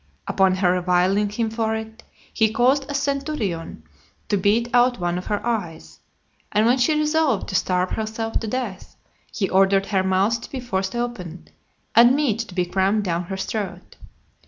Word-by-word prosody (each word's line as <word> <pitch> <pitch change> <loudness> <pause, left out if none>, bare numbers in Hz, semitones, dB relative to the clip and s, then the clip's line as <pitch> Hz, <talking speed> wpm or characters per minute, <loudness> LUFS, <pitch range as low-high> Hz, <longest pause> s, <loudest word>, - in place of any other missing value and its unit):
Upon 190 -1 +3
her 185 -1 +2
reviling 185 +3 +2
him 220 +2 -2
for 220 -1 -1
it, 220 +1 -7 0.3
he 220 -1 +2
caused 265 +5 +2
a 285 - -3
centurion 275 - -3 0.5
to 205 - +2
beat 210 +5 +2
out 245 -1 +3
one 175 0 -1
of 180 - -9
her 210 +1 -2
eyes; 205 -9 -4 0.5
and 210 +1 +2
when 245 +3 +3
she 305 +5 +2
resolved 305 -1 +1
to 190 - -4
starve 180 0 +1
herself 220 +1 -2
to 225 - -5
death, 215 -5 -5 0.4
he 195 - -1
ordered 195 +1 +3
her 195 -2 +1
mouth 190 +5 +1
to - - -9
be 265 - -5
forced 195 -5 -3
open, 195 -8 -5 0.4
and 240 +3 +7
meat 270 -7 0
to 225 -6 -6
be 180 -1 +1
crammed 195 +4 +1
down 175 -2 -2
her 190 +2 -5
throat. 205 +1 -5
215 Hz, 175 wpm, -22 LUFS, 190-240 Hz, 0.5 s, and